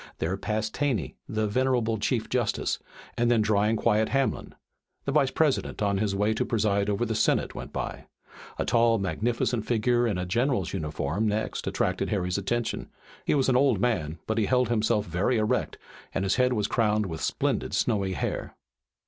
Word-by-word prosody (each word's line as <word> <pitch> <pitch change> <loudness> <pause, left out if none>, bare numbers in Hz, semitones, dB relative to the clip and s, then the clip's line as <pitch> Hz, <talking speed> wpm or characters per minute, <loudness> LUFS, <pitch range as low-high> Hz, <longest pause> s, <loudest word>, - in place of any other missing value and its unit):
There 85 +4 -1
passed 110 +2 -2
Taney, 135 - -1
the 110 0 0
venerable 120 -1 +1
Chief - - 0
Justice, - - 0 0.4
and 120 0 +3
then 115 -3 +4
dry 105 -1 +2
and 110 +1 +1
quiet 110 0 +2
Hamlin, 135 0 -1 0.5
the 140 - 0
Vice 140 -2 +3
President, 150 -2 0
on 100 -1 +1
his 100 -2 0
way 105 +2 +2
to 110 - 0
preside 105 -3 +1
over 105 +3 0
the 115 - -2
Senate, 110 - +1
went - - -7
by. - - -5 0.5
A - - -1
tall 115 -1 +4
and 100 - -1
magnificent 110 +5 0
figure 120 +1 +2
in 105 -5 -1
a 90 - -2
general's 120 - 0
uniform 80 +3 -1
next 105 +1 -2
attracted - - 0
Harry's 90 -1 0
attention. 120 +4 -2 0.4
He - - +2
was 135 -2 +2
an 130 - +3
old 130 -5 +3
man, 90 -9 0
but 110 +1 0
he 105 - +1
held 125 -1 +2
himself 110 -2 +1
very 95 +9 0
erect 110 0 0 0.4
and 95 - 0
his 95 - +1
head 125 0 +3
was 105 -4 0
crowned 105 -2 +1
with 80 -4 -5
splendid - - -1
snowy 95 -2 +1
hair. - - -3
110 Hz, 185 wpm, -27 LUFS, 100-120 Hz, 0.5 s, then